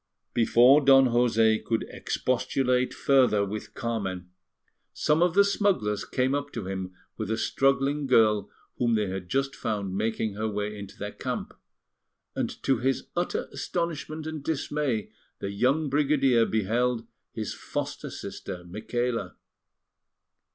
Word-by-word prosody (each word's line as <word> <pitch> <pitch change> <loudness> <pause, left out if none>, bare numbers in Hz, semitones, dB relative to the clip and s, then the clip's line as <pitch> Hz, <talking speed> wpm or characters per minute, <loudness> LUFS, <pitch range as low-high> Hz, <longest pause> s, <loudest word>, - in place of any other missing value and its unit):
Before 120 +5 +6
Don 135 0 +7
José 115 -2 +3
could 115 -1 -1
expostulate 125 0 0
further 125 -7 +3
with 105 +2 -6
Carmen, 95 -7 -3 0.6
some 150 +2 +2
of 175 0 +3
the 200 - +7
smugglers 195 - +1
came 130 +1 0
up 145 0 -2
to 115 -5 -4
him 95 -1 -5 0.2
with 110 -2 -4
a 110 - 0
struggling 135 +3 +1
girl 110 -5 +4 0.3
whom 120 -2 +2
they 105 -2 +1
had 95 -1 -5
just 135 +1 0
found 100 -4 -3
making 110 0 -1
her 110 +2 -2
way 105 0 -3
into 100 -1 -9
their 105 0 -5
camp; - - -4 0.8
and - - -1
to 135 -4 +2
his 135 +2 -1
utter 175 +1 -1
astonishment 160 -2 -3
and 160 -2 -5
dismay 140 -7 -1 0.3
the 100 - -4
young 130 +9 +1
brigadier 135 -4 +3
beheld 115 +3 0 0.3
his - - -4
foster - - -5
sister, 90 -1 -7
Micaela. 110 +1 -3
120 Hz, 135 wpm, -27 LUFS, 105-135 Hz, 0.8 s, Don